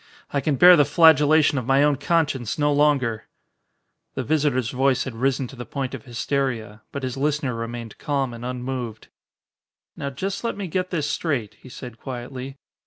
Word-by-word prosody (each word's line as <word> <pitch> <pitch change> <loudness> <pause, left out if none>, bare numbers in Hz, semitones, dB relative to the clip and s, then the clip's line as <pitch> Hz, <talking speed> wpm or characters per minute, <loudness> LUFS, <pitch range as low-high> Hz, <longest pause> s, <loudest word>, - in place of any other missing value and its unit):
I 140 - 0
can 145 +1 +1
bear 180 +5 +9
the 150 - +5
flagellation 150 -1 +5
of 125 - -7
my 135 +1 +4
own 145 -1 +3
conscience 145 -6 0
no 145 -1 +2
longer." 140 -6 +1 0.9
The - - -2
visitor's 140 -6 +1
voice 130 0 +2
had 130 - -6
risen 130 +3 0
to - - -11
the 125 - -6
point 135 0 -4
of 130 -5 -7
hysteria. 120 -3 -2
But 140 - -5
his 130 0 -3
listener 145 -2 0
remained 115 -1 -6
calm 135 -4 -1
and 115 0 -9
unmoved. 125 -2 -5 0.9
"Now 140 - -4
just 190 - -4
let 230 - -2
me 200 - -4
get 185 +1 -2
this 155 -5 -1
straight," 140 -8 -2
he 130 - -13
said 120 -2 -9
quietly. 130 +1 -7
135 Hz, 175 wpm, -23 LUFS, 125-150 Hz, 0.9 s, bear